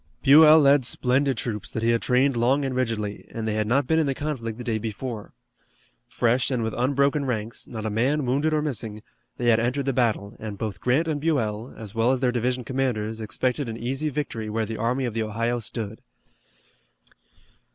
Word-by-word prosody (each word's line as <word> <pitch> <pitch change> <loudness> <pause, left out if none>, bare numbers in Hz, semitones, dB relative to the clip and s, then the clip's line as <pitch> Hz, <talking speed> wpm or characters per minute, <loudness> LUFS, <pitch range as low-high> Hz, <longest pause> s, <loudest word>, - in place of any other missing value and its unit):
Buell 155 +3 +8
led 140 -2 +5
splendid 130 +2 +1
troops 105 -4 -3
that 110 - -4
he 115 - +3
had 115 - +1
trained 130 +1 +2
long 130 +4 +2
and 135 - -2
rigidly, 110 -5 -2
and 110 -1 -4
they 110 - 0
had 110 0 0
not 135 +4 +2
been 160 +4 +2
in 155 - +1
the 135 - -1
conflict 125 -7 -4
the 125 - -6
day 115 -2 -1
before. 110 0 -5 0.8
Fresh 120 +2 +1
and 125 -4 -1
with 110 -1 -2
unbroken 140 +3 +1
ranks, 115 -3 -3
not 110 -2 -6
a 110 - -1
man 130 +7 +1
wounded 140 +5 +1
or 155 -1 +1
missing, 110 -7 -4 0.3
they 120 -1 +1
had 110 - +4
entered 125 +4 -1
the 135 - 0
battle 110 -4 0
and 105 -2 -6
both 110 -1 -5
Grant 135 +7 +2
and 150 -3 -1
Buell, 120 -7 -1
as 110 -3 -9
well 115 +1 +2
as 130 - +1
their 125 -1 +2
division 125 +1 -1
commanders, 115 -4 -2
expected 125 +5 -2
an 115 - -5
easy 135 +6 -2
victory 125 -7 -4
where 110 +1 -1
the 110 +1 -5
Army 125 +4 0
of 120 - -3
the 115 - -1
Ohio 115 +3 -1
stood. 110 0 -6
120 Hz, 205 wpm, -25 LUFS, 110-135 Hz, 0.8 s, Buell